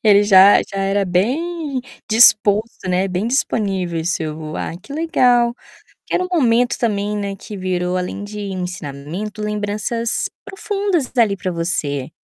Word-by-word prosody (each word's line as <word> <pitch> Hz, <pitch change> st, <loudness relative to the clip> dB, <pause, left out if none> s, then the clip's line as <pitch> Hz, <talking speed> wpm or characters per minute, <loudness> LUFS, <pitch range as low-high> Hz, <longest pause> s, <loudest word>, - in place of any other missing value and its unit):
Ele 205 Hz, -1 st, +6 dB
já 195 Hz, -1 st, +7 dB
já 195 Hz, -, -7 dB
era 195 Hz, +1 st, +1 dB
bem 275 Hz, -, -1 dB, 0.3 s
disposto, 215 Hz, -2 st, +4 dB
né, 185 Hz, +2 st, +1 dB
bem 185 Hz, +3 st, -2 dB
disponível 190 Hz, -9 st, -1 dB
seu 155 Hz, -3 st, -3 dB
ah, -, -, -4 dB
que -, -, -11 dB
legal. 245 Hz, -7 st, +2 dB, 0.6 s
Era -, -, +1 dB
um 365 Hz, -, -5 dB
momento, 245 Hz, -6 st, +2 dB
também, 210 Hz, -2 st, -1 dB
né, 200 Hz, -1 st, -3 dB
que 205 Hz, +1 st, -9 dB
virou, 185 Hz, -1 st, -1 dB
além 180 Hz, +2 st, -4 dB
de 210 Hz, +1 st, -8 dB
ensinamento, 185 Hz, +1 st, -5 dB
lembranças 210 Hz, +2 st, -1 dB, 0.2 s
profundas 395 Hz, -, -2 dB
ali 215 Hz, -4 st, +3 dB
para 185 Hz, 0 st, -3 dB
você. 145 Hz, -5 st, -2 dB
205 Hz, 135 wpm, -19 LUFS, 185-235 Hz, 0.6 s, já